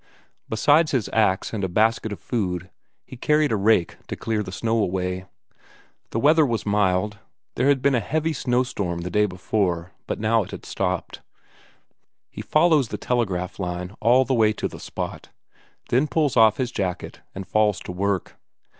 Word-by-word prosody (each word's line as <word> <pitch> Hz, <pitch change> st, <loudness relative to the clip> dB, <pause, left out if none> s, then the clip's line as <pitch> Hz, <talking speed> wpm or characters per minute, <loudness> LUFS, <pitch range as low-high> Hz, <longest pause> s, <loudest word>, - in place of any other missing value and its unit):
Besides 145 Hz, +8 st, +3 dB
his 125 Hz, -6 st, 0 dB
ax 105 Hz, -3 st, +1 dB
and 105 Hz, -3 st, -3 dB
a 95 Hz, -, 0 dB
basket 110 Hz, +3 st, +1 dB
of 105 Hz, -, -6 dB
food, 90 Hz, -7 st, -3 dB, 0.3 s
he -, -, -10 dB
carried 150 Hz, +2 st, +2 dB
a -, -, +2 dB
rake 100 Hz, -3 st, +2 dB
to -, -, -4 dB
clear 110 Hz, -2 st, -2 dB
the 95 Hz, -, -6 dB
snow 115 Hz, +4 st, 0 dB
away. 90 Hz, -1 st, -1 dB, 0.8 s
The 115 Hz, -, -2 dB
weather 155 Hz, +5 st, +5 dB
was 120 Hz, -6 st, -1 dB
mild, 100 Hz, 0 st, +1 dB, 0.3 s
there 125 Hz, -, +1 dB
had 140 Hz, -2 st, +3 dB
been 140 Hz, 0 st, +4 dB
a 125 Hz, -, +3 dB
heavy 155 Hz, +8 st, -1 dB
snowstorm 120 Hz, -, -1 dB
the 90 Hz, +1 st, -5 dB
day 105 Hz, +3 st, +3 dB
before, 90 Hz, -2 st, -1 dB, 0.2 s
but -, -, -3 dB
now 110 Hz, +1 st, +2 dB
it 100 Hz, -, -7 dB
had -, -, -9 dB
stopped. -, -, -3 dB, 1.1 s
He -, -, -7 dB
follows 155 Hz, -4 st, +3 dB
the -, -, -5 dB
telegraph 95 Hz, -8 st, -2 dB
line 90 Hz, +1 st, -4 dB
all 125 Hz, +4 st, +5 dB
the 135 Hz, -, 0 dB
way 110 Hz, -3 st, +3 dB
to -, -, -3 dB
the -, -, -10 dB
spot, -, -, -6 dB, 0.6 s
then 130 Hz, +5 st, +2 dB
pulls 145 Hz, 0 st, +1 dB
off 110 Hz, -3 st, +5 dB
his 125 Hz, -2 st, -2 dB
jacket 95 Hz, -6 st, -4 dB
and 95 Hz, 0 st, -6 dB
falls 105 Hz, -2 st, +2 dB
to -, -, -7 dB
work. 95 Hz, 0 st, -2 dB
110 Hz, 175 wpm, -23 LUFS, 95-125 Hz, 1.1 s, weather